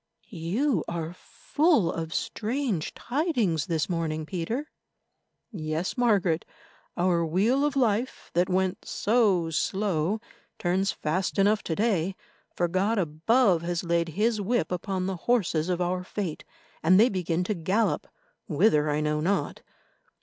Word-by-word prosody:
"You 195 Hz, -, 0 dB
are 170 Hz, -1 st, -4 dB
full 290 Hz, -, +1 dB
of 160 Hz, -1 st, -4 dB
strange 225 Hz, -, -2 dB
tidings 240 Hz, -, 0 dB
this 160 Hz, -2 st, 0 dB
morning, 160 Hz, -3 st, -2 dB
Peter." 195 Hz, -, -3 dB, 0.8 s
"Yes, 160 Hz, -2 st, -3 dB
Margaret, 200 Hz, -9 st, +2 dB, 0.5 s
our 175 Hz, -1 st, +2 dB
wheel 205 Hz, -, +2 dB
of 295 Hz, -1 st, 0 dB
life 240 Hz, -1 st, 0 dB
that 175 Hz, +2 st, +2 dB
went 185 Hz, 0 st, 0 dB
so 200 Hz, -7 st, +2 dB
slow 190 Hz, +2 st, 0 dB, 0.4 s
turns 190 Hz, +2 st, +1 dB
fast 180 Hz, +7 st, -2 dB
enough 205 Hz, +2 st, +3 dB
to 160 Hz, -, -1 dB
day, 195 Hz, -4 st, 0 dB, 0.4 s
for 175 Hz, -, +1 dB
God 195 Hz, +6 st, +1 dB
above 180 Hz, +3 st, +2 dB
has 175 Hz, 0 st, -2 dB
laid 170 Hz, -1 st, +1 dB
His 215 Hz, 0 st, +2 dB
whip 200 Hz, -5 st, 0 dB
upon 185 Hz, +1 st, -2 dB
the 190 Hz, -1 st, -2 dB
horses 180 Hz, -7 st, +1 dB
of 180 Hz, -1 st, 0 dB
our 180 Hz, +1 st, -1 dB
Fate, 180 Hz, -4 st, -4 dB, 0.4 s
and 185 Hz, +4 st, +5 dB
they 230 Hz, -, +7 dB
begin 180 Hz, -3 st, -1 dB
to 210 Hz, -, -1 dB
gallop, 190 Hz, +5 st, 0 dB, 0.4 s
whither 155 Hz, -3 st, +3 dB
I 150 Hz, +1 st, 0 dB
know 150 Hz, 0 st, 0 dB
not. 195 Hz, +5 st, -1 dB
185 Hz, 135 wpm, -27 LUFS, 165-215 Hz, 0.8 s, they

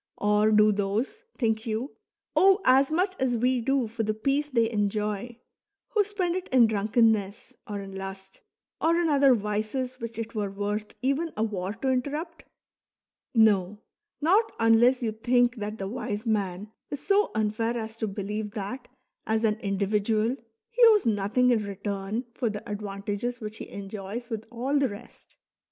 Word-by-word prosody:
Or 210 Hz, +1 st, +3 dB
do 215 Hz, 0 st, +5 dB
those, 205 Hz, -, -1 dB, 0.2 s
think 220 Hz, -3 st, +1 dB
vou, 225 Hz, +4 st, -2 dB, 0.5 s
owe 390 Hz, +1 st, +6 dB
as 265 Hz, +2 st, +5 dB
much 365 Hz, +4 st, +1 dB
as 250 Hz, -2 st, +1 dB
we 250 Hz, +1 st, +1 dB
do 270 Hz, +1 st, +1 dB
for 225 Hz, +1 st, -4 dB
the 215 Hz, -1 st, -1 dB
peace 275 Hz, +6 st, 0 dB
thev 230 Hz, -4 st, +2 dB
enjov, 210 Hz, +2 st, -1 dB, 0.5 s
who 425 Hz, -2 st, +3 dB
spend 380 Hz, -4 st, -2 dB
it 370 Hz, 0 st, -4 dB
in 255 Hz, -2 st, +6 dB
drunkenness, 215 Hz, -1 st, +1 dB
or 205 Hz, -2 st, -4 dB
in 195 Hz, -1 st, -9 dB
lust, 195 Hz, 0 st, -8 dB, 0.4 s
or 335 Hz, +1 st, +3 dB
in 340 Hz, -2 st, +1 dB
other 275 Hz, -3 st, +5 dB
Wees 215 Hz, +5 st, -3 dB
which 230 Hz, -2 st, -6 dB
it 230 Hz, 0 st, -5 dB
were 210 Hz, -3 st, -2 dB
worth 205 Hz, +2 st, -4 dB
even 285 Hz, +5 st, 0 dB
a 215 Hz, -, +1 dB
war 200 Hz, -3 st, -2 dB
to 260 Hz, +4 st, -1 dB
interrupt. 295 Hz, +6 st, -3 dB, 0.9 s
No, 205 Hz, -3 st, +4 dB, 0.4 s
not 395 Hz, +9 st, +3 dB
unless 235 Hz, +3 st, +4 dB
you 225 Hz, -, 0 dB
think 245 Hz, +2 st, +2 dB
that 210 Hz, 0 st, -4 dB
the 195 Hz, -, -4 dB
wise 215 Hz, 0 st, -4 dB
man 205 Hz, -2 st, -1 dB, 0.2 s
is 285 Hz, -, -6 dB
so 410 Hz, +1 st, +3 dB
unfair 220 Hz, +2 st, 0 dB
as 220 Hz, 0 st, -6 dB
to 220 Hz, -, -1 dB
believe 210 Hz, +1 st, -4 dB
that 235 Hz, +4 st, -5 dB, 0.4 s
as 220 Hz, +1 st, +1 dB
an 215 Hz, -1 st, +1 dB
individual 210 Hz, +3 st, 0 dB, 0.4 s
he -, -, -2 dB
owes 430 Hz, -3 st, +5 dB
nothing 220 Hz, +4 st, +2 dB
in 225 Hz, -3 st, +2 dB
return 200 Hz, +3 st, -4 dB
for 240 Hz, -2 st, -1 dB
the 210 Hz, -1 st, -6 dB
advantages 205 Hz, +3 st, -4 dB
which 215 Hz, 0 st, -6 dB
he -, -, -8 dB
enjoys 200 Hz, +4 st, -7 dB
with 220 Hz, -1 st, -4 dB
all 260 Hz, +5 st, 0 dB
the 270 Hz, -2 st, +2 dB
rest. 205 Hz, 0 st, -12 dB
220 Hz, 165 wpm, -27 LUFS, 205-255 Hz, 0.9 s, owe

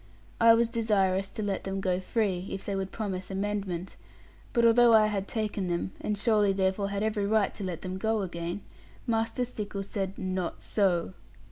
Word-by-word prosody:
I 230 Hz, 0 st, +8 dB
was 235 Hz, 0 st, +3 dB
desirous 195 Hz, -4 st, +1 dB
to 215 Hz, -, -5 dB
let 200 Hz, -2 st, -2 dB
them 195 Hz, 0 st, -3 dB
go 185 Hz, -2 st, 0 dB
free, 190 Hz, -2 st, -1 dB
if 195 Hz, -, -5 dB
they 200 Hz, -, -2 dB
would 195 Hz, 0 st, -3 dB
promise 190 Hz, -4 st, -4 dB
amendment; 195 Hz, -2 st, -3 dB, 0.5 s
but 235 Hz, -2 st, +3 dB
although 230 Hz, 0 st, +7 dB
I 215 Hz, -1 st, +6 dB
had 200 Hz, -2 st, -1 dB
taken 210 Hz, -4 st, -2 dB
them, 175 Hz, +1 st, -1 dB
and 210 Hz, -, -1 dB
surely 210 Hz, -2 st, +3 dB
therefore 190 Hz, +1 st, 0 dB
had 200 Hz, +1 st, -2 dB
every 210 Hz, -2 st, 0 dB
right 215 Hz, -1 st, +2 dB
to 205 Hz, -, -7 dB
let 180 Hz, -4 st, -4 dB
them 185 Hz, 0 st, -4 dB
go 220 Hz, 0 st, +1 dB
again, 175 Hz, +1 st, -4 dB, 0.4 s
Master 230 Hz, +2 st, 0 dB
Stickles 200 Hz, -4 st, -5 dB
said, 195 Hz, -2 st, -3 dB
'Not 185 Hz, -2 st, -3 dB
so.' 185 Hz, -4 st, +1 dB
200 Hz, 180 wpm, -29 LUFS, 190-215 Hz, 0.5 s, I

